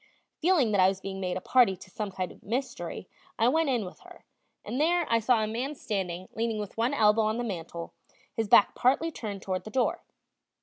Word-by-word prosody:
Feeling 320 -9 +3
that 200 -2 +3
I 185 - +7
was 190 0 0
being 195 0 -6
made 180 -1 -2
a - - -5
party 240 -3 +4
to 190 - -14
some 210 +2 -4
kind 185 -1 -4
of - - -16
mystery, 250 +6 -4 0.3
I 230 +1 +4
went 320 +2 +2
in 240 -6 0
with 180 - -10
her, - - -16 0.4
and 255 - -2
there 345 +2 +3
I 230 - +3
saw 230 0 +3
a - - -1
man 250 +7 -3
standing 185 -7 -3
leaning 225 -1 -1
with 210 -1 -5
one 235 +5 +1
elbow 215 -2 +4
on 215 +1 0
the 240 - -2
mantel, 170 -5 -5 0.4
his 225 -1 -1
back 200 - +6
partly 280 +6 +2
turned 205 -8 -6
toward 185 -1 -2
the - - -8
door. 255 +2 0
220 Hz, 220 wpm, -28 LUFS, 195-255 Hz, 0.4 s, I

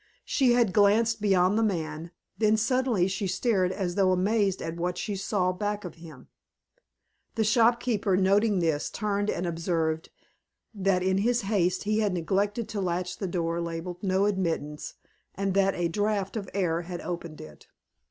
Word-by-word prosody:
She 255 -4 +3
had 235 -6 +2
glanced 215 +2 +3
beyond 195 0 +3
the - - +2
man, 165 -5 -2 0.3
then 215 0 +3
suddenly 235 -4 +1
she 190 +1 -2
stared 185 -1 +1
as 185 -2 -2
though 190 0 +3
amazed 195 +1 +1
at 165 +1 -5
what 175 +1 -2
she 210 -4 -3
saw 190 -1 0
back 205 +2 -3
of 175 - -6
him. 160 -5 -13 1.1
The 225 - +1
shopkeeper, 225 -3 +2
noting 200 +2 +3
this, 160 -4 0
turned 205 -1 -1
and 175 - -1
observed 165 -2 -1 0.6
that 195 -3 +1
in 190 +1 +2
his 240 +3 +1
haste 190 -3 0
he 215 +1 0
had 205 -3 +1
neglected 200 +6 -1
to 205 - -3
latch 180 0 -2
the 195 - -2
door 170 -1 -1
labeled 170 +2 -5
"No 190 0 +1
Admittance," 165 -7 -2 0.4
and 195 0 -1
that 195 0 +2
a 175 -1 0
draught 205 +2 -1
of 200 -4 -4
air 175 -4 0
had 175 0 -6
opened 170 -3 -6
it. 75 -2 -12
190 Hz, 165 wpm, -27 LUFS, 175-210 Hz, 1.1 s, She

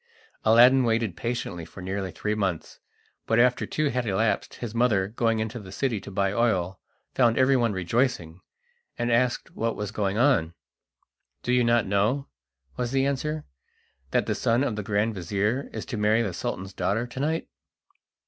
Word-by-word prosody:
Aladdin 125 +4 +6
waited 115 -5 0
patiently 100 -4 -3
for 90 - -12
nearly 95 +1 -3
three 105 +5 -2
months, 95 -6 -3 0.5
but 115 - +2
after 125 +1 +3
two 155 -1 0
had 125 -2 -2
elapsed 105 +3 0
his 120 -3 -6
mother, 115 -5 +2
going 115 +1 0
into 110 +2 -3
the 95 -3 -11
city 115 -1 -1
to - - -9
buy 100 0 0
oil, 95 -6 0 0.3
found 120 -3 +3
everyone 130 -3 +3
rejoicing, 95 -3 -1 0.6
and 120 0 0
asked 120 +1 +1
what 115 0 -1
was 105 -1 -4
going 100 -2 -1
on. 115 - +2 0.9
"Do 125 - 0
you 125 0 +4
not 115 0 +3
know," 105 +8 +1 0.5
was 120 -1 -2
the 135 0 +2
answer, 150 +3 -2 0.6
"that - - +1
the - - 0
son 115 +3 +1
of 120 -6 -1
the 105 - -3
grand 105 +2 0
vizir 105 - -1
is - - -6
to 120 - -5
marry 105 +2 +3
the 100 -5 -3
Sultan's 95 +2 -4
daughter 110 +5 0
to 125 +1 -8
night?" 160 +3 -1
115 Hz, 170 wpm, -26 LUFS, 100-125 Hz, 0.9 s, Aladdin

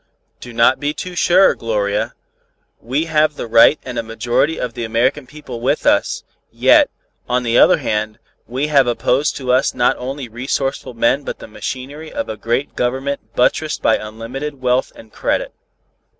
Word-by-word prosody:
"Do 120 - -10
not 115 +2 +3
be 145 +1 -2
too 180 -1 -6
sure, 180 +2 +5
Gloria. 105 -2 -2 0.6
We 135 +7 -1
have 155 -2 +2
the - - -5
right 115 +6 +6
and 125 -2 -4
a - - +1
majority 120 +7 0
of 125 -2 -3
the 120 - -5
American 125 +5 0
people 130 -4 -9
with 125 - 0
us; - - +2 0.3
yet, - - +5 0.4
on 125 0 +1
the 120 0 +2
other - - +6
hand, 110 0 -2 0.3
we 130 +5 -2
have 140 -4 +3
opposed 125 +4 +1
to 130 -2 -2
us 130 +2 +2
not 120 - +3
only 130 +1 -5
resourceful 130 +2 -3
men 115 +5 +2
but - - -5
the - - -11
machinery 140 +7 -7
of - - -4
a 110 - -3
great 120 +6 -2
Government 130 -2 -3
buttressed 150 +5 +1
by 110 - +4
unlimited 120 +7 -6
wealth 125 0 +1
and 110 -1 -15
credit." - - -1
125 Hz, 170 wpm, -18 LUFS, 115-140 Hz, 0.6 s, right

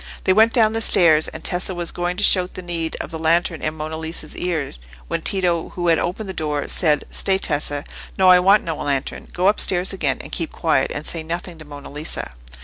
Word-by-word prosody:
They 190 - +3
went 220 +3 +5
down 220 -2 +3
the 225 - -1
stairs, 160 -7 +4
and - - -9
Tessa 180 0 -1
was 175 -1 -1
going 175 0 -3
to 205 - -1
shout 185 -2 +2
the 185 - -6
need 170 -2 -4
of - - -6
the 160 - -6
lantern 165 +1 +1
in 155 0 -2
Monna 155 +1 -5
Lisa's 160 -1 -6
ear, 170 -6 -2 0.3
when - - -2
Tito, 180 -4 0
who 175 -1 0
had 165 - +4
opened 185 +4 -3
the 190 - -5
door, 150 -4 -3
said, 150 -4 +2
"Stay, 190 -1 +1
Tessa—no, 145 +3 -1
I 180 0 +8
want 195 +3 +4
no 165 -2 -4
lantern: 140 -2 -3
go 180 +2 0
upstairs 190 -2 +3
again, 150 -8 0
and 140 - -11
keep 165 - -3
quiet, 155 -5 +1
and 150 - -4
say 165 - -2
nothing 170 +1 -6
to 155 - -11
Monna 145 -1 -10
Lisa." 150 - -5
170 Hz, 220 wpm, -21 LUFS, 155-185 Hz, 0.3 s, I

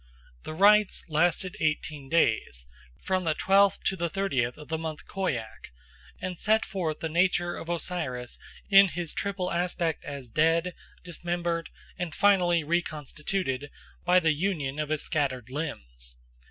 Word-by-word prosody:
The 155 - -5
rites 210 +3 +4
lasted 175 +3 +1
eighteen 150 -2 -2
days, 110 - +1 0.4
from 185 -1 0
the 160 -2 0
twelfth 195 +2 +3
to 195 - +1
the 170 -2 -2
thirtieth 135 -11 -1
of 150 - -11
the 160 0 -2
month 160 -2 -5
Khoiak, 130 - -4 0.5
and 180 -2 -5
set 220 +1 +2
forth 165 -6 -3
the 165 - -1
nature 175 +1 +1
of 165 - -8
Osiris 160 -8 -3 0.3
in 195 -1 +8
his 170 -1 -4
triple 195 -2 -2
aspect 170 -2 -1
as 140 -3 -7
dead, 165 +7 +2 0.3
dismembered, 175 -1 -3 0.3
and 175 -4 -3
finally 180 -5 +4
reconstituted 150 -2 -2 0.3
by 180 +1 +5
the 160 -3 +2
union 150 -4 -2
of 150 -1 -2
his 155 -1 -1
scattered 130 -6 -1
limbs. - - -6
165 Hz, 140 wpm, -28 LUFS, 150-180 Hz, 0.5 s, in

